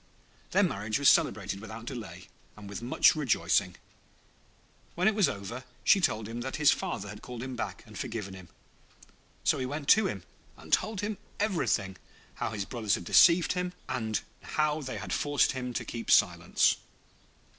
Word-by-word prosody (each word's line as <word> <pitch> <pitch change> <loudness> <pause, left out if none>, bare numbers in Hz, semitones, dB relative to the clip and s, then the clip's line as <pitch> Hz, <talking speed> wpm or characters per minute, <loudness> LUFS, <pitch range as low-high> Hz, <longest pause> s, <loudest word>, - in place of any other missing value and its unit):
Their - - +3
marriage 105 +4 -1
was 140 -1 +5
celebrated 95 - +2
without 110 +2 -9
delay, 120 -5 -7 0.3
and 105 -1 -10
with 100 +2 -6
much 120 +6 +4
rejoicing. 145 -7 +1 1.2
When 180 +2 +2
it 220 - +4
was 200 -8 +3
over, 105 +5 -6 0.2
she 195 - +5
told 110 -9 0
him 115 +1 -5
that 130 +2 -4
his 150 -1 +5
father 100 - -3
had 105 +1 -9
called 125 -1 -7
him 130 -1 -5
back - - -5
and - - -14
forgiven 100 -4 -5
him. 90 -2 -12 0.9
So - - +2
he 130 - -2
went 145 +1 -5
to 215 -2 +6
him 95 - -5 0.3
and - - -8
told 215 -3 +1
him 205 -1 -3 0.2
everything; 165 - 0 0.4
how - - -3
his 105 -3 -4
brothers 110 -4 0
had 90 - -7
deceived 170 - +6
him, 180 0 -2
and 110 -4 -2 0.2
how 155 0 0
they 130 -2 -5
had - - -5
forced 145 -1 +2
him 125 -2 -4
to - - -2
keep 115 -1 -6
silence. - - +4
125 Hz, 175 wpm, -29 LUFS, 105-155 Hz, 1.2 s, to